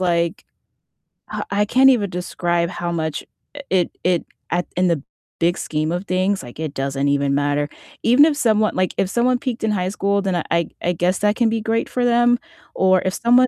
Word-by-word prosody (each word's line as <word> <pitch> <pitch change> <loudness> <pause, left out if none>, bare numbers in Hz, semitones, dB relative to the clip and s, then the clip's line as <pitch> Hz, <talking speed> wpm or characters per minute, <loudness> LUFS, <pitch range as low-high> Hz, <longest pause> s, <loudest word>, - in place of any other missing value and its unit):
like 170 -2 0 0.9
I - - -3
I 205 +1 +2
can't 265 +4 +5
even 215 -6 +2
describe 175 -1 -1
how 175 -2 -4
much 160 -2 -3 0.5
it 185 -2 +2
it 180 -2 +2 0.3
at 175 +1 0
in 180 0 +3
the 160 -5 0 0.4
big 175 +2 +2
scheme 155 +1 -2
of 180 +3 -3
things, 185 +1 0
like, 120 +1 -11
it 155 -3 -3
doesn't 135 +1 -1
even 140 0 +1
matter. 145 +1 0 0.4
Even 250 +6 +6
if 310 -2 +2
someone 215 -5 +2
like, 185 0 0
if 190 - +1
someone 245 +1 +2
peaked 245 -3 -4
in 220 - +1
high 185 -2 -1
school, 200 0 0
then 190 -2 -1
I 170 - -1
I 170 -1 +1
I 175 - +1
guess 180 +2 +1
that 210 +1 +2
can 235 -2 +3
be 225 0 -1
great 225 +1 0
for 250 -1 0
them, 240 0 +4 0.4
or 185 -1 +3
if 185 - -1
someone 245 +2 +4
185 Hz, 205 wpm, -20 LUFS, 170-225 Hz, 0.9 s, Even